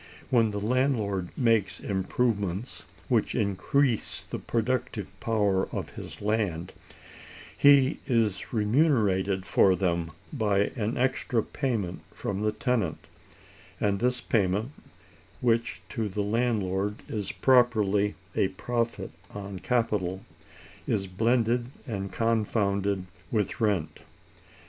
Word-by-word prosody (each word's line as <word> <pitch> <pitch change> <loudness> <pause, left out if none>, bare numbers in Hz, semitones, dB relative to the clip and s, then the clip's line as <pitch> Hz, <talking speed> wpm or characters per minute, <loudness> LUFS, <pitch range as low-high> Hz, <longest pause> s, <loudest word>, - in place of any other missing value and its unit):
When 115 -3 +4
the 105 -1 -3
landlord 110 -6 0
makes 110 -6 +2
improvements 100 +1 -1 0.2
which - - +1
increase 115 +5 +1
the - - -6
productive 120 -2 -1
power 105 -4 +1
of - - -4
his - - -8
land, 100 -5 -1 0.8
he 140 -1 +5
is 110 -6 +1
remunerated 105 - +2
for 95 0 +4
them 85 -3 0 0.2
by 105 -6 +1
an 110 -1 -1
extra 125 -3 +1
payment 115 -11 -2
from 100 0 -3
the 105 0 +2
tenant; 110 - -1 0.7
and 100 -1 +1
this 125 +1 +1
payment, 105 +3 +1 0.7
which 115 -1 0
to 110 -5 -2
the 100 +2 -2
landlord 105 -3 0
is 105 -3 -3
properly 105 -6 +3 0.2
a - - +3
profit 115 +5 -2 0.2
on 100 -2 -6
capital, 100 -6 0 0.6
is 100 -3 0
blended 115 +5 +1 0.2
and 100 -6 -4
confounded 100 -4 0 0.3
with 105 0 -1
rent. 90 -8 0
105 Hz, 105 wpm, -28 LUFS, 100-120 Hz, 0.8 s, he